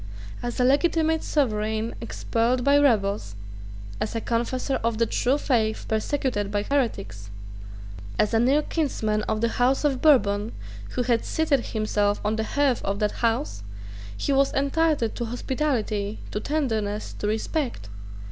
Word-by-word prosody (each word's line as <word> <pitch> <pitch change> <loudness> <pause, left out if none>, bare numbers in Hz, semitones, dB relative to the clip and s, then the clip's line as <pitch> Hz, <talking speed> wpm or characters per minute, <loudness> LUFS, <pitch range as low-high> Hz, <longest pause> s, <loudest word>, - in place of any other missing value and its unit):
As 240 +1 -4
a - - +4
legitimate 320 +4 +3
sovereign 220 -5 0
expelled 235 +2 0
by 280 +2 +5
rebels, 200 - +1 0.6
as 215 - -3
a - - +1
confessor 240 +4 -1
of 230 -1 0
the 230 - +3
true 250 +4 +1
faith 225 -6 0
persecuted 220 -2 -1
by 205 0 -1
heretics, 105 - -2 0.9
as 210 - +2
a 225 - +4
near 270 +6 +3
kinsman 220 -11 -1
of 215 - -1
the 230 - +3
House 260 +4 +3
of 275 -3 +1
Bourbon, 215 -8 +3 0.4
who 250 - +1
had 240 -2 +1
seated 295 -6 0
himself 210 -2 0
on 210 +1 +1
the 220 - -1
hearth 280 -4 +2
of 195 0 -1
that 210 0 0
House, 225 - -1 0.6
he 280 - 0
was 275 0 +3
entitled 280 -3 +1
to 235 - -3
hospitality, 230 -4 -2
to 210 - -2
tenderness, 220 -7 -2
to 205 - -4
respect. 220 - -2
235 Hz, 145 wpm, -25 LUFS, 215-275 Hz, 0.9 s, by